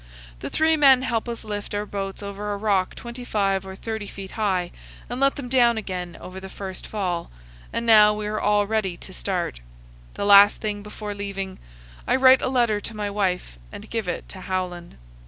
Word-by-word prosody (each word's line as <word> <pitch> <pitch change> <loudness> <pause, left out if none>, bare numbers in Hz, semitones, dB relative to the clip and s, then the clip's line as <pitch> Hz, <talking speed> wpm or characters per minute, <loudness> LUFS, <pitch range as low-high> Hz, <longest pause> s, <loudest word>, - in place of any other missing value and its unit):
The - - -5
three 320 0 +3
men 270 -4 +6
help 235 -2 -1
us 235 - -5
lift 205 -1 -5
our 205 +1 -1
boats 195 0 -5
over 200 +1 -4
a - - -3
rock 200 -3 +1
25 210 -6 -2
or 190 - -7
30 220 0 -5
feet 195 -1 -8
high 190 -5 0 0.4
and 245 +1 -5
let 275 0 +3
them 275 -3 -6
down 240 -2 +4
again 180 -5 -5
over 185 +1 -8
the 190 0 -9
first 190 -1 -7
fall, 180 -5 -2 0.4
and 235 - -2
now 215 -2 +8
we 210 0 -3
are 215 +1 -2
all 205 0 +3
ready 200 -4 -1
to - - -11
start. - - -3 0.6
The - - -2
last 200 0 +8
thing 210 -1 -3
before 210 0 -6
leaving, 195 -2 -5 0.5
I - - +3
write 260 0 +6
a - - 0
letter 235 -5 +2
to 225 - -7
my 205 -1 -3
wife 180 - -1
and - - -10
give 225 -4 -2
it 175 - -3
to 190 - -9
Howland. 180 - -4
205 Hz, 195 wpm, -24 LUFS, 190-225 Hz, 0.6 s, now